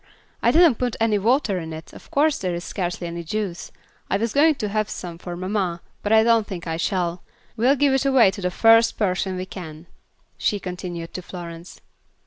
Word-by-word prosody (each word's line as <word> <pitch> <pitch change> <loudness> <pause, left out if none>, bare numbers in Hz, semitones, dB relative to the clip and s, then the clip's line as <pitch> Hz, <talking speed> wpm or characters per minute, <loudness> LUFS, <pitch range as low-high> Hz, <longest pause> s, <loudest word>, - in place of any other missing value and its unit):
I 235 - +4
didn't 315 -2 +5
put 245 -2 -1
any 220 -2 +2
water 225 -3 +2
in 160 -1 -6
it, 160 +1 -10
of - - -14
course 295 +1 +2
there 180 -2 -2
is 170 - -5
scarcely 175 -2 -3
any 170 0 -5
juice. 190 0 -4 0.4
I 195 - +2
was 225 +2 -2
going 305 +2 +5
to 215 -6 -3
save 215 -1 0
some 170 -2 -7
for 175 -1 -6
mamma, 185 -2 -2 0.2
but 205 - -2
I 220 0 +6
don't 230 -2 +3
think 180 -4 -6
I 165 -1 -2
shall. 175 -1 -1 0.3
We'll 245 +5 +3
give 280 0 +3
it 270 +1 +1
away 255 -8 +5
to 200 - -8
the 180 - 0
first 225 +4 +4
person 190 -2 0
we 185 - -3
can," 165 -4 -9 0.5
she 205 - +1
continued 180 -2 -6
to 185 - -5
Florence. 170 -1 -9
195 Hz, 205 wpm, -23 LUFS, 175-230 Hz, 0.5 s, I